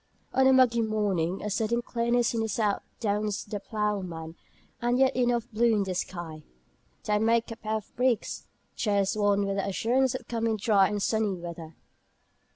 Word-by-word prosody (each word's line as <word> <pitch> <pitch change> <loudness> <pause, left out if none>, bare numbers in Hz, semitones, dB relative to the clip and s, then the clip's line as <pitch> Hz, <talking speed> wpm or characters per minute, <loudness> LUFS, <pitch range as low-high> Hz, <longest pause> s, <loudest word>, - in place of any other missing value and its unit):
On 265 0 +4
a - - +6
muggy 250 -3 +4
morning 200 -5 0
a 210 - -3
sudden 230 +3 0
clearness 235 0 +1
in 230 - 0
the 220 - -1
south 210 -1 0 0.2
"drowns 210 -2 -1
the 205 0 -5
ploughman." 190 -7 -3 0.5
And 240 +1 +1
yet 265 0 +3
enough 240 -2 +1
blue 230 +1 +3
in 205 - +2
the 190 -1 -3
sky 170 -3 -5 0.6
"tae 210 0 +1
mak' 230 +1 +2
a - - -4
pair 220 -1 -3
o' 220 - -1
breeks" 250 -2 0 0.3
cheers 200 -2 +1
one 205 -1 +2
with 195 0 -2
the 195 - -1
assurance 245 +6 +1
of - - -7
coming 230 -1 -1
dry 200 -2 +4
and 205 0 -2
sunny 220 -3 +1
weather. 170 -2 -8
215 Hz, 175 wpm, -28 LUFS, 195-235 Hz, 0.6 s, a